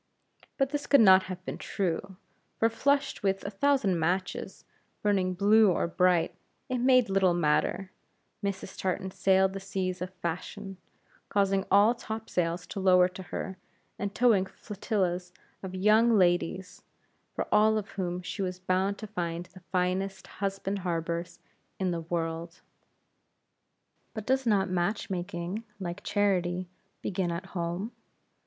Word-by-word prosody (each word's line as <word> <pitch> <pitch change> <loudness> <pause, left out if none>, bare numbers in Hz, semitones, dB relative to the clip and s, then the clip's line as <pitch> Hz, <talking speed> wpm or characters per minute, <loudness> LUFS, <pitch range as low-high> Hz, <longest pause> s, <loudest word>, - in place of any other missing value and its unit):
But 270 -1 +1
this 290 -1 -3
could 280 - +6
not 190 -2 +7
have 185 0 -7
been - - -5
true; 190 0 -2 0.4
for, 225 - +3
flushed 280 +3 +1
with 195 -1 0
a 200 - -3
thousand 215 -6 +2
matches 180 +3 -2 0.4
burning 190 -3 +1
blue 210 +2 +5
or 170 - 0
bright, 175 -1 +2 0.4
it 255 -1 -1
made 255 -1 +5
little 190 -2 +3
matter 175 +4 +1 0.5
Mrs. 200 -1 -3
Tartan 190 0 -2
sailed 190 0 +3
the 195 - -4
seas 185 -2 -3
of 180 0 -4
fashion, 185 +3 -5 0.5
causing 195 -1 +1
all 205 +4 +6
topsails 180 -7 -3
to - - -6
lower 180 -1 +5
to 185 +1 -9
her; 190 +1 -5 0.4
and 200 0 -3
towing 220 -6 +4
flotillas 185 -3 -2 0.3
of 190 -1 -6
young 215 +4 +4
ladies, 180 0 +1 0.5
for - - -2
all 215 +1 +5
of 205 -2 -4
whom 180 -2 -3
she 200 - -5
was 185 -1 -2
bound 185 +2 0
to 220 - -7
find 175 -4 -3
the 185 - -13
finest 185 +1 -1
husband 195 0 -3
harbors 170 -1 -3 0.4
in 185 -2 0
the 170 -1 -2
world. 165 +1 -4 1.5
But 215 -2 -5
does 265 0 +1
not 200 -3 +3
match 185 +3 -1
making, 180 +3 -3 0.2
like 175 -2 -5
charity, 185 -3 +1 0.4
begin 185 -2 -1
at 170 +3 -4
home? 175 +5 -3
190 Hz, 140 wpm, -29 LUFS, 180-205 Hz, 1.5 s, not